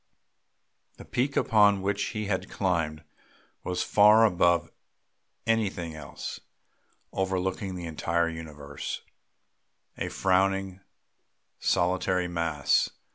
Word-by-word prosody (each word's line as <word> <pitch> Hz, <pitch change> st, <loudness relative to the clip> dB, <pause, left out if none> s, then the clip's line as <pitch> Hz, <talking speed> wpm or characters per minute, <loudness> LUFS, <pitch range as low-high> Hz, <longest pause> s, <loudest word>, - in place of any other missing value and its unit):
The -, -, -11 dB
peak 135 Hz, +3 st, -1 dB
upon 105 Hz, -3 st, +4 dB
which 100 Hz, +1 st, 0 dB
he 105 Hz, -2 st, -3 dB
had 95 Hz, -2 st, -2 dB
climbed 80 Hz, -5 st, -1 dB, 0.6 s
was 90 Hz, -1 st, -1 dB
far 105 Hz, +2 st, +6 dB
above 85 Hz, -4 st, +2 dB, 0.7 s
everything 100 Hz, -7 st, 0 dB
else, 75 Hz, -2 st, -7 dB, 0.7 s
overlooking 95 Hz, 0 st, -1 dB
the 90 Hz, -1 st, -6 dB
entire 85 Hz, +1 st, 0 dB
universe; 75 Hz, -3 st, -6 dB, 1.0 s
a -, -, -2 dB
frowning 95 Hz, 0 st, +1 dB, 0.8 s
solitary 90 Hz, 0 st, +1 dB
mass. 85 Hz, -5 st, +1 dB
90 Hz, 90 wpm, -28 LUFS, 85-100 Hz, 1.0 s, far